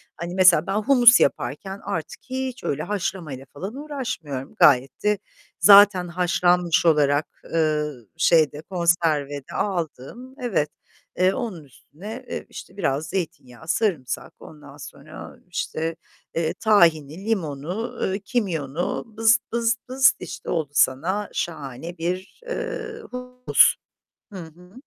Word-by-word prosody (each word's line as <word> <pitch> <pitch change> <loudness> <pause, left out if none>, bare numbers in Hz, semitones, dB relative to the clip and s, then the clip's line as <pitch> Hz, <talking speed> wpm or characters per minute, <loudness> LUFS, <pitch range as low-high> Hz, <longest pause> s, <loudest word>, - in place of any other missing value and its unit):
hani, 170 +1 -6
mesela 185 -4 +5
ben 195 - -1
humus 240 +2 +6
yaparken 150 +10 -1
artık 160 -1 -5
hiç 260 0 -4
öyle 145 +2 -2
haşlamayla 175 -8 -4
falan 190 - -6
uğraşmıyorum. 245 - -5
Gayet 130 -2 +4
de 210 0 +2 0.4
zaten 200 -3 +7
haşlanmış 175 0 +2
olarak, 150 -2 +3 0.3
eee, 155 -2 +1 0.3
şeyde, 155 -3 +3
konserve 165 -5 0
de 135 - -14
aldım. 195 - -4
Evet, 195 -12 0 0.5
eee, 185 +1 +3
onun 200 - -5
üstüne, 195 - -11
e, - - -5
işte, 190 - -11
biraz 155 -4 -1
zeytinyağı, 160 -7 -5
sarımsak, 165 - -1
ondan 145 -2 -13
sonra, 150 +2 -11
işte, 165 -2 -3 0.4
eee, 165 -1 0
tahini, 170 -6 +2
limonu, 180 - -3
eee, 195 - -2
kimyonu, 175 - -2
bızt 225 +1 +3
bızt 230 0 +1
bızt, 265 +1 +4
işte, 185 - -7
oldu 160 -4 -1
sana 170 +10 +1
şahane 160 +1 -5
bir, 180 +3 -4
eee, 470 -2 -5
humus. 250 0 +3 0.6
Hı 195 - -7
hı. 175 +2 -12
175 Hz, 120 wpm, -23 LUFS, 150-210 Hz, 0.6 s, zaten